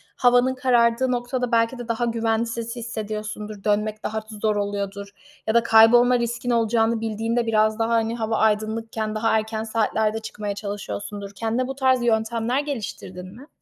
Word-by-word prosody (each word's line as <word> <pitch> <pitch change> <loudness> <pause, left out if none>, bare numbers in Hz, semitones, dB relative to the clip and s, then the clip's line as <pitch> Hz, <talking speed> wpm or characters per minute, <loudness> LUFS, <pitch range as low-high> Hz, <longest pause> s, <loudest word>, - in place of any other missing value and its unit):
havanın 245 +1 +3
karardığı 250 0 +2
noktada 245 0 -2
belki 230 +2 +2
de 240 -1 -7
daha 230 +1 0
güvensiz 230 0 -1
hissediyorsundur. 215 -3 -5
Dönmek 210 +1 0
daha 220 0 -2 0.2
zor 215 -1 +2
oluyordur 200 -1 -3 0.4
ya 220 - +1
da 235 - +5
kaybolma 240 +2 +6
riskin 235 +1 -3
olacağını 230 -1 +2
bildiğinde 225 +2 -1
biraz 215 0 +2
daha, 225 0 +1
hani, 225 0 +1
hava 220 -1 -1
aydınlıkken 220 0 0
daha 225 +1 +1
erken 220 0 -3
saatlerde 220 -1 0
çıkmaya 210 -2 -5
çalışıyorsundur. 200 - -6
Kendine 230 +4 -1
bu 270 - -5
tarz 260 -2 +2
yöntemler 230 +2 +1
geliştirdin 195 -9 -6
mi? 275 +5 -13
225 Hz, 150 wpm, -23 LUFS, 215-235 Hz, 0.4 s, kaybolma